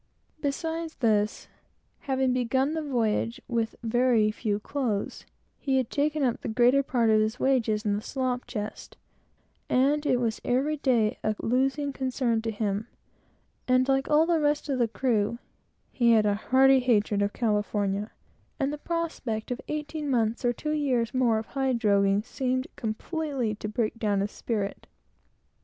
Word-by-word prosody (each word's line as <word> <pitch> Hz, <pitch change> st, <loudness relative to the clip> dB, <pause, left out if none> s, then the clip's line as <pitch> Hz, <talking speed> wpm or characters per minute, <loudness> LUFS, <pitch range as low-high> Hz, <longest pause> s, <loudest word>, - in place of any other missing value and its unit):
Beside 325 Hz, +3 st, -2 dB
this, 215 Hz, -3 st, +1 dB, 0.5 s
having 265 Hz, -2 st, 0 dB
begun 260 Hz, +4 st, +1 dB
the 320 Hz, -, -2 dB
voyage 235 Hz, -3 st, -1 dB
with 230 Hz, -2 st, -1 dB
very 235 Hz, -2 st, +3 dB
few 210 Hz, -1 st, -2 dB
clothes, 230 Hz, -4 st, -3 dB, 0.3 s
he 270 Hz, -2 st, 0 dB
had 255 Hz, -3 st, -1 dB
taken 300 Hz, 0 st, 0 dB
up 245 Hz, -3 st, 0 dB
the -, -, -5 dB
greater 245 Hz, +4 st, +4 dB
part 240 Hz, -4 st, +1 dB
of 215 Hz, 0 st, +4 dB
his 220 Hz, +4 st, -1 dB
wages 230 Hz, -5 st, +1 dB
in 205 Hz, -1 st, +1 dB
the -, -, -4 dB
slop 255 Hz, 0 st, -2 dB
chest, 210 Hz, -2 st, -6 dB, 0.7 s
and 285 Hz, +4 st, +2 dB
it 250 Hz, -, +3 dB
was 230 Hz, -3 st, -1 dB
every 275 Hz, +5 st, +1 dB
day 240 Hz, -6 st, +1 dB
a 215 Hz, 0 st, 0 dB
losing 270 Hz, +4 st, 0 dB
concern 255 Hz, -4 st, 0 dB
to 225 Hz, -, -3 dB
him; 210 Hz, 0 st, -2 dB, 0.8 s
and, 255 Hz, 0 st, +3 dB
like 270 Hz, 0 st, +1 dB
all 305 Hz, +1 st, +5 dB
the 335 Hz, -1 st, +2 dB
rest 295 Hz, 0 st, 0 dB
of 265 Hz, -2 st, 0 dB
the 235 Hz, -, +3 dB
crew, 225 Hz, -2 st, 0 dB, 0.5 s
he 235 Hz, -2 st, +3 dB
had 215 Hz, -2 st, +4 dB
a 205 Hz, -, +3 dB
hearty 265 Hz, +5 st, +4 dB
hatred 215 Hz, -5 st, +2 dB
of 205 Hz, 0 st, +1 dB
California, 210 Hz, -2 st, -1 dB, 0.5 s
and 275 Hz, 0 st, 0 dB
the 300 Hz, -, -6 dB
prospect 295 Hz, -10 st, -3 dB
of 250 Hz, -, -3 dB
eighteen 300 Hz, 0 st, -4 dB
months 230 Hz, -1 st, 0 dB
or 245 Hz, -, +3 dB
two 300 Hz, +5 st, -4 dB
years 255 Hz, -6 st, 0 dB
more 245 Hz, -4 st, +2 dB
of 220 Hz, -, -3 dB
hide 265 Hz, -1 st, -1 dB
droghing 200 Hz, -2 st, +2 dB
seemed 255 Hz, 0 st, -1 dB
completely 260 Hz, +1 st, -3 dB
to 210 Hz, 0 st, -6 dB
break 225 Hz, +1 st, -2 dB
down 205 Hz, -3 st, +1 dB
his 205 Hz, +1 st, -2 dB
spirit. 205 Hz, -4 st, -4 dB
245 Hz, 160 wpm, -27 LUFS, 215-270 Hz, 0.8 s, all